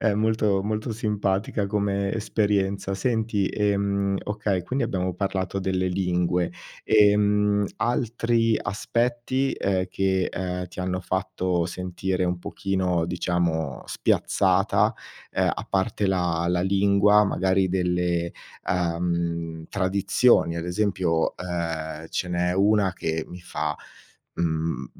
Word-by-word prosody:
È 110 -3 +2
molto 105 -2 +1
molto 110 +2 -2
simpatica 105 -2 -1
come 100 -1 0
esperienza. 100 -3 0
Senti, 110 -1 0
ehm, 100 -1 0
okay, 105 -3 -1
quindi 130 +2 -1
abbiamo 90 -1 -1
parlato 95 0 -2
delle 95 -1 0
lingue. 90 -1 0 0.3
Ehm, 105 -1 +4
altri 115 -1 +1
aspetti, 120 +6 -1
eh, 95 -1 0
che 95 -1 0
uhm 90 0 -3
ti - - -15
hanno 90 0 -2
fatto 90 -2 -1
sentire 90 +1 -3
un 90 0 -1
pochino 90 -2 -1
diciamo 85 -4 -1
spiazzata, 95 +1 +2 0.4
eh - - 0
a - - -5
parte 100 +1 0
la 90 -3 0
la 90 0 +1
lingua, 100 +2 +4
magari 95 -1 +1
delle 90 -2 0 0.4
uhm, 85 -2 -1
tradizioni. 100 0 +2
Ad 85 - -3
esempio, 90 -3 0
ehm, 80 -3 -4
ce 90 - -2
n'è 90 0 0
una 100 0 +3
che 80 -2 -2
mi 90 0 -9
fa, 75 -3 -3 0.6
mhmm, 80 -1 -1
95 Hz, 115 wpm, -25 LUFS, 90-105 Hz, 0.6 s, Ehm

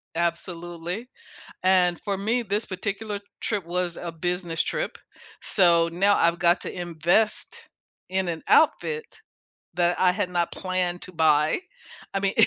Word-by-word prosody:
Absolutely. 175 +5 -3 0.5
And 180 -2 +4
for 200 -1 -2
me, 225 +5 0
this 205 +2 -1
particular 200 +2 -4 0.2
trip 205 -6 -2
was 175 0 -2
a 170 - -5
business 175 0 -1
trip, - - -3 0.4
so, 170 -4 +4
now 195 +4 +3
I've 170 0 +3
got 175 0 +3
to - - -5
invest 175 +6 +1 0.5
in 190 0 0
an 165 -2 -3
outfit 460 +8 +3 0.7
that 175 0 +1
I 185 - +5
had 185 -1 -1
not 175 -1 0
planned 185 -2 -2
to - - -7
buy, 155 -2 +3 0.6
I 195 - +1
mean, 195 0 0
180 Hz, 140 wpm, -25 LUFS, 170-195 Hz, 0.7 s, I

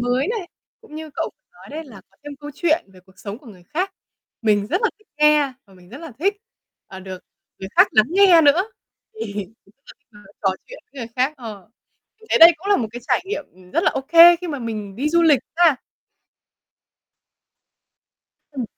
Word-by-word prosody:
mới 250 - 0
này, 425 -6 -4 0.3
cũng 445 -9 -16
như 315 0 -8
cậu - - -3
vừa - - -60
nói - - -17
đấy 315 +2 -6
là 220 -8 -13
có - - -32
thêm 290 -1 -8
câu 295 - -8
chuyện 325 0 +1
về 185 - -17
cuộc 190 - -24
sống 205 +1 -7
của 275 - -21
người 190 -6 -14
khác. 370 - -3 0.5
Mình 205 -2 +2
rất 360 - -1
là 460 - +2
thích 430 - -30
nghe 300 -2 +4
và 195 - -20
mình 180 -1 -19
rất 255 +8 -10
là 325 -5 -10
thích, 400 +5 0 0.5
à, 190 - -10
được 185 -1 -8 0.4
người 190 - -7
khác - - +7
lắng 215 0 +4
nghe 370 -2 +6
nữa, 300 +5 +5 0.5
thì 215 - -6
mình 205 -2 -4 0.2
rất 195 - -24
là - - -12
thích 285 - -48
nói 205 -1 -18
trò 195 - +2 0.2
chuyện - - -12
với 270 - -9
người 230 - -6
khác, 260 +4 +1
ờ. 215 -5 -10 0.5
Mình 440 - -18
thấy - - +3
đây 335 +1 +10
cũng 365 - -11
là 405 - +4
một 225 - -2
cái 240 - -7
trải - - +2
nghiệm, 390 -7 -4
ừm, 180 0 -19
rất - - 0
là - - +4
ô - - -3
kê 340 +1 +8
khi 355 0 -7
mà 290 - -4
mình 215 -5 -6
đi 280 +6 -1
du 340 +2 +2
lịch 305 -5 +4 0.2
ha! 335 -6 +5 2.8
Ừm. 265 -4 -4
285 Hz, 225 wpm, -21 LUFS, 210-340 Hz, 2.8 s, đây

